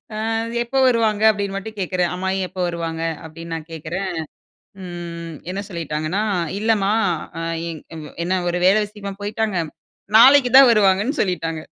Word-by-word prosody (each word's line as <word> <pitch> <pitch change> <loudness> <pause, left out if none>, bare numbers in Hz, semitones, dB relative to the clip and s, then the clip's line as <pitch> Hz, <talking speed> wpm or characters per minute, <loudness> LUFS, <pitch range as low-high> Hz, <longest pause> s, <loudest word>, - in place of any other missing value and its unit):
"ஆ - - -4 0.5
எப்ப 240 +3 -9
வருவாங்க?" 220 -3 +2
அப்டின் 200 -2 -1
மட்டும் 215 +2 -6
கேக்குறேன். 180 -2 0
"அம்மாயி 190 +1 -1
எப்ப - - -19
வருவாங்க?" 165 -1 -4 0.2
அப்டின் 165 +1 -8
நான் 160 0 -7
கேட்குறேன். 170 +5 -4 0.7
ம் 170 -2 -7 0.2
என்ன 195 +2 -3
சொல்லிட்டாங்கன்னா, 165 +2 -2 0.4
இல்லமா 210 -2 +2 0.5
அ - - -3 0.3
எங் 160 -2 -7
இவ்வ 155 -2 -9
என்ன? 185 +1 +1
ஒரு 175 - -1
வேல 190 +2 +6
விஷயமா 205 -1 -8
போயிட்டாங்க. 215 -1 -1 0.6
நாளைக்கு 260 +1 +7
தான் 270 -2 +9
வருவாங்கன்னு 210 +6 +2
சொல்லிட்டாங்க. 165 -4 -2
190 Hz, 145 wpm, -21 LUFS, 170-215 Hz, 0.7 s, தான்